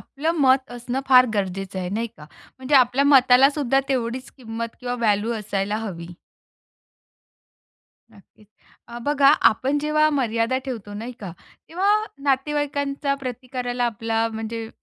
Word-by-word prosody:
आपलं 305 +4 -3
मत 260 -1 +3
असणं 245 +2 -4
फार 255 -1 +7
गरजेचं 195 -1 -3
आहे, 180 - -3
नाही 225 +3 -2
का? 150 - -12 0.3
म्हणजे 260 +2 -1
आपल्या 260 +1 +4
मताला 265 -1 +6
सुद्धा 275 -2 +1
तेवढीच 255 -1 -2
किंमत 230 -2 -6
किंवा 245 0 -3
व्हॅल्यू 220 -1 0
असायला 205 0 -2
हवी. 175 -6 -6 2.0
नक्कीच. 210 0 -22 0.4
अ, 235 0 -8
बघा 285 0 +3 0.2
आपण 270 +6 -1
जेव्हा 305 +1 +2
मर्यादा 235 -2 0
ठेवतो, 220 -6 -6
नाही 230 +4 -6
का? 195 -4 -6 0.4
तेव्हा 375 +5 0 0.3
नातेवाईकांच्या 285 0 -1
प्रतिकाराला 250 -1 -4
आपला 225 0 -1
म्हणजे 225 0 -5
245 Hz, 130 wpm, -22 LUFS, 225-275 Hz, 2.0 s, फार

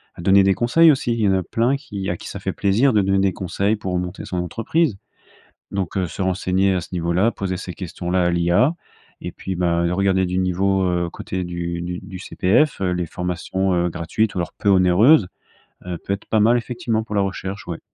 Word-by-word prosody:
à - - -9
donner 95 +2 +5
des 95 0 +4
conseils, 155 - +5
aussi. 130 -4 0
Il 115 - -2
y 105 - +3
en - - +3
a 95 - +1
plein 115 +8 +1
qui 100 -8 -6
à 90 - -3
qui - - -10
ça - - -6
fait - - -3
plaisir 115 +7 +2
de 105 - +4
donner 95 0 +1
des 95 -1 +2
conseils 100 +4 -1
pour 95 -3 -3
monter 90 +1 -5
son 90 - -4
entreprise. 115 - 0 0.7
Donc, 95 -1 -3
heu, 95 -2 0
se 90 - -6
renseigner 95 +1 +1
à - - +1
ce - - -10
niveau-là, 90 +5 +1
poser 95 -4 -3
ces 90 - -7
questions-là 90 +1 -2
à 85 - +2
l'IA. 85 - +3 0.5
Et - - -5
puis 95 - -5
bah, 85 -1 +1
regarder 95 0 +2
du 90 +1 -2
niveau, 95 +1 +1
heu 85 -1 -1
côté 95 0 -4
du 85 -1 -4
du 90 0 -4
du 95 -1 -9
CPF, 100 +10 +1
heu, 90 -2 +1
les 90 -1 -2
formations, 90 +2 -2
heu, 90 0 +1
gratuites 90 +6 -1
ou - - -1
alors 85 - -3
peu 100 - 0
onéreuses, 95 - +5 0.6
heu, 90 -1 -4
peut 100 - -3
être 100 - -9
pas 110 - +1
mal 115 +3 +5
effectivement 115 -2 -2
pour 105 - -7
la - - +3
recherche, 95 0 -5
ouais. 85 -2 -5
95 Hz, 225 wpm, -21 LUFS, 90-105 Hz, 0.7 s, donner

